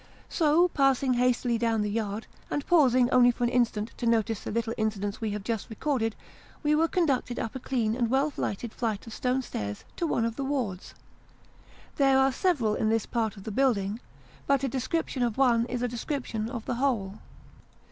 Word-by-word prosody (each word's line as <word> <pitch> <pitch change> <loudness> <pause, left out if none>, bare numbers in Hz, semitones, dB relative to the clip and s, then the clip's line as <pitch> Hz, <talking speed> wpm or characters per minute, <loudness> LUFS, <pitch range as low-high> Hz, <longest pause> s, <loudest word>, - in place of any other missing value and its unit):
So, 330 +2 +4
passing 270 -3 +2
hastily 245 -1 +1
down 225 -2 +1
the - - -1
yard, 215 0 -2 0.2
and 290 - -2
pausing 255 -8 +4
only 245 -1 +6
for 245 0 -1
an 240 - +2
instant 230 -3 +1
to 240 - -2
notice 225 -2 +1
the - - -7
little 230 0 -1
incidents 205 -1 -2
we 220 - -1
have 205 -1 -4
just 225 -1 -3
recorded, 225 -1 -1 0.5
we 300 0 +3
were 320 +2 +3
conducted 275 -9 0
up 225 - -3
a 260 - -5
clean 235 -4 -1
and 235 -2 0
well 275 +4 +1
lighted 215 +3 -3
flight 220 -4 -2
of 230 - -9
stone 255 +2 0
stairs 105 - -5
to 340 - 0
one 230 -6 +1
of 230 0 -3
the 275 - -2
wards. 250 -10 -3 1.0
There 270 -2 +4
are 265 0 +4
several 260 - +1
in 215 - 0
this 225 0 +1
part 220 -3 -2
of 195 - -10
the 215 - -5
building, 215 -4 +1 0.5
but 275 -1 +2
a - - +2
description 265 +2 -2
of 235 -2 0
one 240 -3 +3
is 250 0 -3
a - - +2
description 235 -2 -3
of 235 -3 -6
the - - -2
whole. 220 -7 0
240 Hz, 200 wpm, -28 LUFS, 220-270 Hz, 1.0 s, only